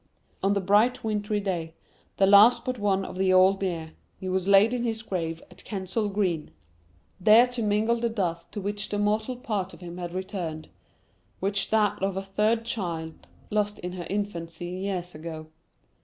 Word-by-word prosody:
On 195 +1 +2
the 200 - +1
bright 220 +7 +3
wintry 210 -1 -1
day, 170 -5 -3 0.4
the 195 - +5
last 215 +5 +7
but 255 -2 -2
one 195 -2 +1
of 185 - -7
the 190 -1 +3
old 185 +1 +5
year, 165 -4 -3 0.3
he 190 - -7
was 185 0 -1
laid 200 +4 +6
in 250 - -1
his 225 -2 -2
grave 165 -6 -3
at 180 - -15
Kensal 205 +1 -2
Green, 185 -6 -1 0.7
there 215 +5 +7
to 245 -1 -4
mingle 215 +2 +2
the 235 0 0
dust 175 -7 -3
to - - -4
which 205 +1 -3
the 205 - -2
mortal 215 +4 0
part 205 -6 -3
of - - -17
him 175 0 -8
had 175 0 -5
returned, 180 -5 -4 0.7
with 195 +1 0
that 215 -3 +2
of 195 -1 -1
a 195 - -2
third 215 +4 +1
child, 170 -9 -4 0.2
lost 210 0 0
in 180 - -5
her 175 -2 -6
infancy 175 -5 -4
years 180 0 -4
ago. 155 0 -7
195 Hz, 180 wpm, -27 LUFS, 180-210 Hz, 0.7 s, last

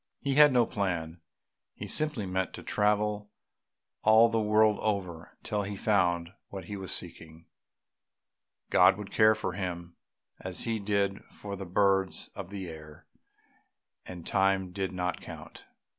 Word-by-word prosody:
He 140 - -1
had 150 +1 +7
no 125 -2 +4
plan, 85 -6 -3 0.5
he - - -7
simply 150 -9 0
meant 95 0 -2
to - - -10
travel 105 0 0 0.7
all 110 +2 +6
the 115 -1 0
world 105 0 +3
over 95 -6 -3
till 105 -1 -1
he 100 0 -5
found 90 -4 +1 0.2
what 95 -3 -7
he 100 - -6
was 95 -1 -5
seeking; 80 -1 -5 1.3
God 90 +2 +6
would 105 -1 -8
care 110 0 +5
for 110 - -4
him 85 -3 -5 0.4
as 95 -1 -2
He 115 -1 -1
did 100 -1 -1
for 100 -1 -8
the 95 -1 -7
birds 95 +1 +1
of 95 -3 -8
the 100 -2 -6
air, 75 -2 -11 1.0
and 90 -2 -9
time 95 -1 +1
did 95 0 -3
not 90 0 -3
count. - - -11
95 Hz, 145 wpm, -29 LUFS, 90-105 Hz, 1.3 s, had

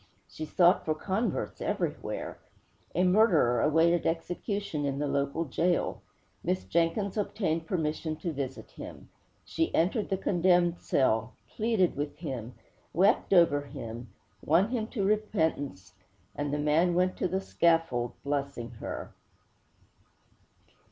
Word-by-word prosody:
She 155 - -6
sought 175 +3 +4
for 155 - 0
converts 195 +8 -2
everywhere. - - -3 0.6
A 180 - +3
murderer 180 - +4
awaited 165 +3 +3
execution 175 0 -2
in 140 -1 -1
the 145 - -1
local 140 +3 0
gaol. 170 +5 0 0.4
Miss 95 0 0
Jenkins 170 - 0
obtained 170 -6 -1
permission 160 -2 -1
to 165 +1 -4
visit 135 -2 -5
him. - - -10 0.4
She 325 - -1
entered 195 +6 +1
the 195 - 0
condemned 175 -2 +2
cell, 115 -3 +1 0.2
pleaded 215 -5 +2
with 145 +1 -4
him, 130 -7 -6 0.4
wept 195 +6 +3
over 170 -6 +5
him, 120 -4 -7 0.3
won 175 +7 +3
him 230 -3 -1
to 210 -5 -2
repentance, 160 - -1 0.4
and 145 -1 -2
the 145 - 0
man 155 +4 +2
went 185 +1 +2
to - - 0
the 190 +2 -1
scaffold 165 -10 +1
blessing 140 -4 -3
her. - - -6
165 Hz, 125 wpm, -29 LUFS, 140-185 Hz, 0.6 s, over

